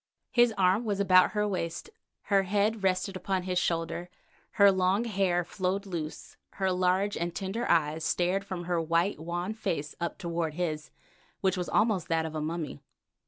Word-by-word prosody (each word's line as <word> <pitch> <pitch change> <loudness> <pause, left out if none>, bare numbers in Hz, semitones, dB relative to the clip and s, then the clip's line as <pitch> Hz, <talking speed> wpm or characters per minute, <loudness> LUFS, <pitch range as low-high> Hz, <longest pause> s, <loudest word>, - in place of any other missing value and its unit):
His 240 -1 +5
arm 190 +4 +3
was 205 -3 -1
about 185 -1 +5
her 210 0 +1
waist, 185 - -3 0.3
her 200 -1 +3
head 205 +3 0
rested 190 0 0
upon 185 0 -2
his 180 -1 0
shoulder, 170 0 -2 0.4
her 200 -1 +6
long 190 +3 +2
hair 190 -5 +1
flowed 190 +3 -2
loose, 165 -5 -6 0.2
her 190 -1 0
large 185 +2 +1
and 170 0 -3
tender 195 +6 -3
eyes 160 -1 +2
stared 180 +4 +1
from 185 -3 -5
her 175 -1 0
white, 170 +3 +1
wan 175 +5 -3
face 170 -9 -3
up 170 -1 -3
toward 170 -3 -2
his 155 -3 -2
face, - - -32 0.5
which 190 0 +2
was 180 - -3
almost 210 -6 +2
that 165 -1 +1
of 160 - -5
a 155 - -3
mummy. 155 - -4
185 Hz, 175 wpm, -29 LUFS, 170-195 Hz, 0.5 s, her